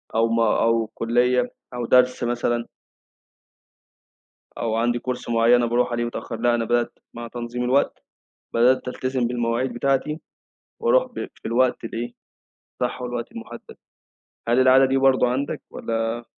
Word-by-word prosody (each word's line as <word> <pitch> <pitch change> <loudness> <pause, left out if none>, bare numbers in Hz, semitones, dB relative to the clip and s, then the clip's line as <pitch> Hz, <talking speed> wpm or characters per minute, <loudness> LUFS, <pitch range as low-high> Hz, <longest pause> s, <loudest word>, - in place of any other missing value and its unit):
أو 115 +1 +3
م 115 0 +1
أو 115 0 +2
كلية 120 +3 +1 0.2
أو 120 -1 -3
درس 125 +1 +3
مثلًا. 120 0 -1 1.9
أو 115 -2 -1
عندي 120 +1 +1
كورس 125 +1 -5
معين 115 +1 +4
أنا 120 -1 +3
باروح 120 +1 +1
عليه 120 0 0
متأخر 120 -1 -5
لأ 120 0 +3
أنا 115 -1 0
بدأت 120 +1 0 0.2
مع 120 0 -7
تنظيم 120 +1 -4
الوقت، 130 +3 +1 0.5
بدأت 125 +2 +3
ألتزم 130 -1 -1
بالمواعيد 120 +1 -1
بتاعتي 135 +5 0 0.6
وأروح - - +4
ب - - -6
في - - -24
الوقت 125 +2 +1
الإيه، 120 +1 -5 0.7
صح 125 +1 -2
والوقت 120 -1 -4
المحدد 115 - -10 0.7
هل 120 +2 +3
العادة 130 +1 +6
دي 135 0 +1
برضه 135 -2 +4
عندك 135 +3 -2
والّا 115 +1 -3
120 Hz, 145 wpm, -23 LUFS, 115-125 Hz, 1.9 s, العادة